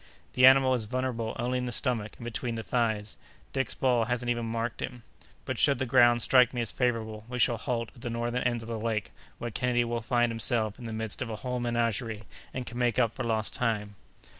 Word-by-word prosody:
"The 125 0 +7
animal 130 0 +6
is 115 -4 -1
vulnerable 125 -2 -2
only 125 +1 -1
in 125 - -2
the 125 - -3
stomach 115 -4 0
and 120 - -9
between 120 0 -3
the 115 - -4
thighs. 110 -4 -1 0.4
Dick's 135 -1 -1
ball 125 -3 +2
hasn't 120 +1 -1
even 120 -1 -2
marked 115 +1 -3
him; 125 -3 -5 0.4
but - - -3
should 140 -1 +4
the 130 - -1
ground 120 -2 +5
strike 125 -1 +5
me 120 - 0
as 115 - -2
favorable, 110 -4 -1
we 125 - -4
shall 120 -1 +3
halt 115 -1 -2
at 120 - -15
the 120 - -4
northern 120 +1 -1
end 120 -2 0
of - - -9
the 115 -1 -3
lake, 110 -2 -2 0.3
where 120 - -5
Kennedy 120 +2 +1
will 120 0 -2
find 120 0 +1
himself 110 0 -1
in 120 - -8
the 115 - -5
midst 110 0 -2
of 120 - -2
a 110 - -3
whole 125 +3 -3
menagerie, 115 -2 -1 0.3
and 130 -1 -4
can 120 +1 -6
make 120 -1 +1
up 115 -3 +3
for - - -4
lost 110 -2 0
time." 105 -4 -1
120 Hz, 230 wpm, -29 LUFS, 115-125 Hz, 0.4 s, The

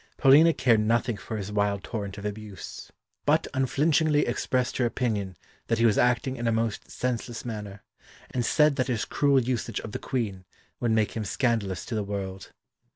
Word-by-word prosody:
Paulina 145 +5 +7
cared 120 -7 +3
nothing 115 +2 +1
for 110 +2 -6
his 100 0 -5
wild 100 -1 0
torrent 100 -4 -5
of 100 - -7
abuse, 105 -1 -7 0.3
but - - +3
unflinchingly 150 +3 +2
expressed 125 +1 -1
her 125 - +2
opinion 105 -7 -2 0.3
that 115 - +1
he 115 - +3
was 110 -3 +4
acting 125 +2 +2
in 120 - -2
a - - +3
most 115 -1 -1
senseless 120 -1 -3
manner, 105 -4 -6 0.5
and 125 - -1
said 150 +3 +3
that 130 - +1
his 120 -4 -1
cruel 140 -2 +3
usage 125 -1 -2
of 105 - -7
the - - -4
Queen 105 -8 -3 0.4
would 120 - 0
make 110 -1 +2
him 110 - -3
scandalous 105 -4 -1
to 120 - -6
the 110 -2 0
world. 95 -1 -5
115 Hz, 180 wpm, -27 LUFS, 105-125 Hz, 0.5 s, Paulina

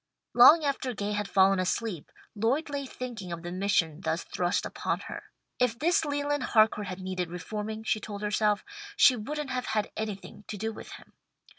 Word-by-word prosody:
Long 300 +6 +8
after 265 -3 -1
Gay 205 +1 -2
had 210 -1 -1
fallen 195 0 +4
asleep, 185 -2 -2 0.2
Lloyd 250 +9 0
lay 280 -1 -3
thinking 235 -9 -7
of 170 0 -5
the 175 - -5
mission 180 -4 0
thus 160 -1 -1
thrust 180 +1 -1
upon - - -2
her. - - -8 0.3
If 250 -2 +2
this 320 +4 +2
Leland 290 0 -1
Harcourt 215 -4 +3
had 185 0 -6
needed 185 -2 -3
reforming, 210 +5 -5
she 215 - 0
told 205 -1 -7
herself, 210 0 +1 0.3
she 255 - +7
wouldn't 285 +5 -4
have 250 -1 -2
had 215 -1 -1
anything 210 -1 -6
to 210 - -5
do 220 +2 -3
with - - -10
him. - - -14
215 Hz, 180 wpm, -28 LUFS, 190-250 Hz, 0.3 s, Long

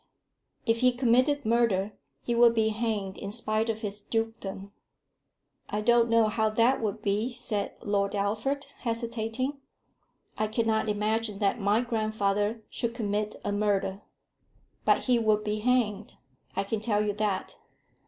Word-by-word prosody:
"If 230 -1 +2
he 250 0 +4
committed 255 +3 +2
murder, 215 -3 +2 0.3
he 240 - -1
would 235 0 +5
be 220 -1 +3
hanged 215 -3 -2
in 200 - -5
spite 220 0 -1
of 220 -1 -2
his 205 -2 -3
dukedom." 205 -4 -4 1.0
"I 210 - -1
don't 235 +1 +4
know 230 -1 +4
how 220 0 +1
that 230 +5 +3
would 210 -3 -2
be," 210 +5 0
said 230 -4 -3
Lord 200 0 0
Alfred, 220 +8 -1
hesitating. 235 +3 -2 0.8
"I 215 - +2
cannot 220 0 0
imagine 210 0 0
that 205 +2 0
my 205 +3 +3
grandfather 215 -2 0
should 235 0 -3
commit 210 -2 -1
a 205 - 0
murder." 200 -1 0 0.8
"But - - +4
he 245 -2 +3
would 215 -2 +2
be 210 0 -1
hanged; 220 -3 +1 0.4
I - - +1
can 210 +2 -2
tell 210 -1 +1
you 205 - 0
that. 205 -2 -2
220 Hz, 145 wpm, -28 LUFS, 205-235 Hz, 1.0 s, would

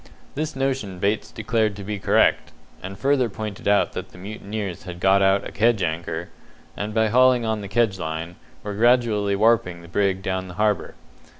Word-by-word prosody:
This 155 +1 -3
notion 135 -8 -2
Bates 100 +4 -1
declared 110 -1 0
to 100 - -8
be 105 +1 -4
correct, - - +2 0.3
and 95 +1 -7
further 135 -2 +2
pointed 105 -1 -6
out 100 0 +3
that - - -6
the - - -16
mutineers 100 -1 -6
had 90 -1 -7
got 95 +2 +4
out 95 0 +3
a - - -9
kedge 115 -3 +2
anchor, 80 +1 -3 0.5
and 105 +1 -4
by 110 0 +2
hauling 125 0 +4
on 110 -1 -1
the 100 - -6
kedge 105 -2 +1
line, 80 +1 -4 0.3
were 105 - -4
gradually 110 -3 +2
warping 100 -5 +2
the - - -12
brig 95 +2 0
down 95 0 -2
the 90 - -10
harbour. 105 -1 0
105 Hz, 185 wpm, -23 LUFS, 95-115 Hz, 0.5 s, got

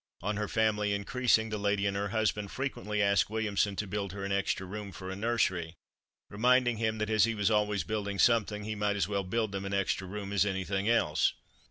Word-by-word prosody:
On 105 +2 -1
her 105 0 -2
family 105 -2 +1
increasing 110 +1 +1
the 105 -1 -3
lady 100 0 +1
and 100 0 0
her 100 +1 -1
husband 105 -1 -1
frequently 120 -6 -2
asked 100 0 +3
Williamson 105 -2 0
to 105 - -2
build 100 -1 -4
her 100 -1 -5
an 100 - -3
extra 100 -1 0
room 100 +1 -6
for 95 +1 -7
a - - -4
nursery, 95 -6 0 0.5
reminding 120 +2 +3
him 110 0 0
that 105 0 -2
as 110 -1 +5
he 115 -1 -1
was 105 +1 +1
always 105 -1 +1
building 100 -2 -3
something, 105 -2 +2
he 110 +1 -3
might 105 -1 0
as 95 -4 0
well 100 -1 -1
build 110 +3 -1
them 95 0 -4
an 100 0 -2
extra 95 -1 -1
room 100 +1 -5
as 100 - +4
anything 95 +1 -1
else. 75 -10 +2
105 Hz, 215 wpm, -30 LUFS, 100-110 Hz, 0.5 s, as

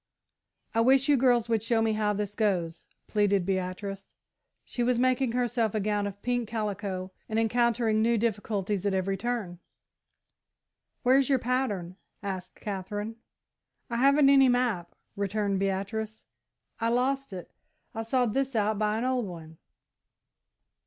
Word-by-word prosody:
"I 225 - +3
wish 265 +3 +4
you 290 - +5
girls 245 -3 +3
would 225 -2 +1
show 230 +1 +1
me 225 -1 +2
how 215 -1 +1
this 205 0 -3
goes," 185 -6 -1 0.2
pleaded 205 -3 +1
Beatrice. 195 +1 -4 0.5
She 245 - -4
was 245 0 +2
making 255 -1 +2
herself 240 -3 0
a - - +2
gown 205 0 0
of 200 0 -9
pink 245 -2 -1
calico, 200 -4 -3 0.2
and 220 - -1
encountering 225 -1 +2
new 230 +1 +3
difficulties 205 -3 -1
at 195 - +1
every 190 +1 0
turn. 205 -5 -3 1.4
"Where's 265 +1 +4
your 270 - +4
pattern," 230 -8 -2 0.3
asked 185 -2 -5
Katherine. 205 +2 -4 0.7
"I 235 - -1
haven't 275 +2 +5
any 270 -2 +6
map," 240 -9 0 0.2
returned 200 0 -1
Beatrice; 200 +3 -3 0.5
"I 230 0 +1
lost 265 +2 0
it. 180 -2 -8 0.4
I 225 - -3
sawed 235 0 +1
this 270 0 -1
out 215 -1 +1
by 215 0 +1
an 230 - -2
old 255 -4 0
one." 160 -3 -10
220 Hz, 145 wpm, -28 LUFS, 195-245 Hz, 1.4 s, any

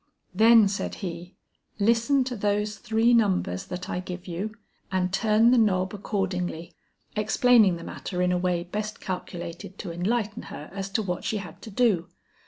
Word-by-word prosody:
'Then,' 220 +2 +7
said 195 +1 -3
he, 175 +1 -7 0.4
'listen 235 +6 +3
to 250 -1 -4
those 210 0 -1
three 225 +2 +2
numbers 190 - +1
that 180 0 -5
I - - -2
give 180 -1 -7
you; 195 +5 -4 0.4
and 185 -1 0
turn 220 +3 +4
the 250 - +5
knob 185 -3 +2
accordingly,' 180 -4 -3 0.4
explaining 215 -2 +4
the 170 - -8
matter 180 +1 -5
in 180 - +2
a 180 - +2
way 175 -1 0
best 210 +4 -4
calculated 180 -1 -6
to 180 - -6
enlighten 210 +5 -1
her 150 - -9
as 195 0 -4
to 220 - +1
what 180 -3 -3
she 215 - -1
had 180 -5 -9
to - - -9
do. 205 -6 +2
195 Hz, 170 wpm, -26 LUFS, 180-220 Hz, 0.4 s, Then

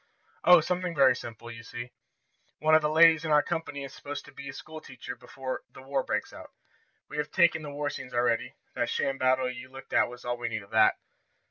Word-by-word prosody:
"Oh, 180 -1 +8
something 180 +1 -2
very 135 -3 +6
simple. 120 -1 -8
You 115 -1 -9
see, 120 +2 -8 0.7
one 155 +1 +2
of 155 - +7
the 150 - +1
ladies 160 0 +6
in 160 - -3
our 150 -1 +5
company 145 -4 -4
is 135 - -8
supposed 145 0 -7
to - - -13
be 140 - -9
a - - -6
school 155 0 -9
teacher 125 -3 -8
before 130 +1 -6
the 135 - -13
war 135 0 0
breaks - - -3
out. - - -11 0.6
We 150 - -8
have 150 0 -1
taken 170 -1 +3
the 150 - -7
war 145 0 -3
scenes 130 -1 -8
already 120 -1 +1 0.2
that - - -1
sham 135 0 -1
battle 130 0 +3
you 125 0 -7
looked 135 0 -11
at - - +4
was 125 0 -11
all 120 0 -1
we 120 -1 -3
need 110 -2 -4
of 100 - -19
that. - - +5
135 Hz, 230 wpm, -28 LUFS, 125-155 Hz, 0.7 s, Oh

